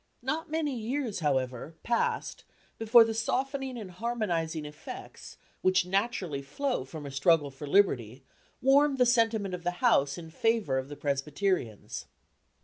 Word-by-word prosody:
Not 305 +5 -2
many 305 -3 -1
years, 240 -1 -2
however, 135 0 -1
passed 235 -1 -1 0.4
before 225 +1 +7
the 225 0 -2
softening 265 +3 -2
and 205 -5 -7
harmonizing 175 -7 -2
effects, 150 0 -10 0.2
which 185 -1 +3
naturally 190 - -1
flow 195 - -2
from 150 +2 -8
a 140 - -6
struggle 145 +1 +3
for 135 +2 -8
liberty, 135 - +2 0.4
warmed 275 +1 +5
the 250 - +5
sentiment 225 -5 +2
of 180 -1 -5
the 175 0 -2
House 145 - +3
in 165 -2 -9
favour 205 -8 +1
of 130 +1 -7
the 145 - -7
Presbyterians. 145 - -2
185 Hz, 140 wpm, -29 LUFS, 145-240 Hz, 0.4 s, before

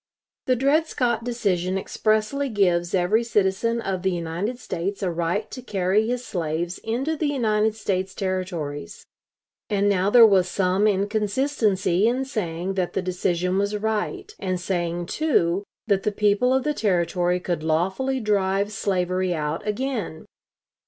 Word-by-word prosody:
The 255 - +4
Dred 285 +6 +2
Scott 240 -6 0
decision 195 -6 0
expressly 215 +8 0
gives 180 -5 +1
every 190 +6 +2
citizen 220 +1 +1
of 190 -4 -2
the 190 - +1
United 175 +7 -3
States 195 -3 -4
a 180 - 0
right 175 +5 -2
to 255 - -7
carry 200 -1 +1
his 245 +1 -2
slaves 170 0 -3
into 255 +8 -2
the 310 -1 -1
United 220 -6 +1
States 190 -3 -2
Territories. 180 -7 -4 0.6
And 205 -1 +1
now 195 -1 +2
there 235 +1 +8
was 190 -4 +4
some 190 +3 +2
inconsistency 205 -1 +1
in 255 +3 0
saying 190 -7 -3
that 185 -2 -2
the 190 - -1
decision 180 0 0
was 200 +1 0
right, 220 - -2
and 185 -2 -2
saying, 175 -1 -2
too, 195 - +1 0.2
that 200 -3 +2
the 210 - 0
people 210 +4 +2
of 265 0 +2
the 300 - 0
Territory 180 - +1
could 175 -3 -2
lawfully 190 +12 0
drive 200 -2 +1
slavery 185 -3 0
out 155 +5 -3
again. 215 -7 -3
195 Hz, 145 wpm, -24 LUFS, 180-225 Hz, 0.6 s, there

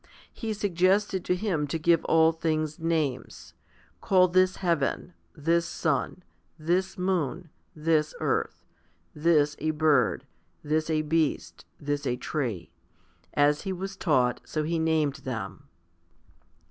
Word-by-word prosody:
He 225 -2 -4
suggested 190 0 +1
to 180 - +1
him 180 -7 -1
to 155 - -2
give 165 0 +3
all 160 0 +4
things 155 -1 -2
names: 160 -6 -2 0.5
"Call 185 -1 +4
this 185 +1 +3
heaven, 170 -1 -1 0.2
this 165 +3 +1
sun, 160 +3 -2 0.3
this 185 +4 -1
moon, 180 -4 -2 0.2
this 155 -1 +1
earth, - - -2 0.5
this 150 -2 +2
a 155 - -1
bird, 150 -6 +2 0.4
this 155 +2 0
a 155 -1 +1
beast, 155 -1 -1
this 145 -1 -2
a 125 - 0
tree;" 120 - -4 0.6
as 145 0 +3
he 190 - -4
was 195 +1 -5
taught, 130 -9 +1
so 155 - -3
he 165 +2 -1
named 155 -3 +1
them. 130 0 -6
160 Hz, 125 wpm, -27 LUFS, 145-175 Hz, 0.6 s, all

